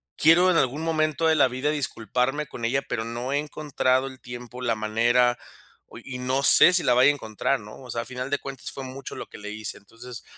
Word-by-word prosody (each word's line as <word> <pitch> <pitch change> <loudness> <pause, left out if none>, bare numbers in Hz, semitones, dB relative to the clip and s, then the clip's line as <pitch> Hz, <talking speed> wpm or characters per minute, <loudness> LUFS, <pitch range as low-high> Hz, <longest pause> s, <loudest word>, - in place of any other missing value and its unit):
quiero 175 +4 +5
en 165 - +2
algún 140 +5 0
momento 155 -1 0
de 160 - +4
la 140 - +5
vida 130 +4 -2
disculparme 135 +1 -1
con 115 -2 -6
ella, 135 +3 0
pero 110 - -2
no 120 +4 -4
he 145 - +2
encontrado 140 -3 0
el 130 -1 -11
tiempo, 120 0 -9
la 115 -2 0
manera, 120 +3 +2 0.5
oye, - - -13
y 125 -2 -6
no 130 +2 -1
sé 180 - +7
si 180 - +3
la 125 - +3
vaya 125 +3 +6
a - - +3
encontrar, 110 +2 -2
¿no?, 105 +4 -12
o 125 - -12
sea, 115 - -2
a - - -15
final 130 +2 -5
de 145 - +1
cuentas 135 -2 -7
fue 135 - -7
mucho 130 +1 -8
lo - - -6
que - - -12
le 105 0 -7
hice. 110 0 -5
Entonces, 115 +4 -11
130 Hz, 235 wpm, -25 LUFS, 120-145 Hz, 0.5 s, sé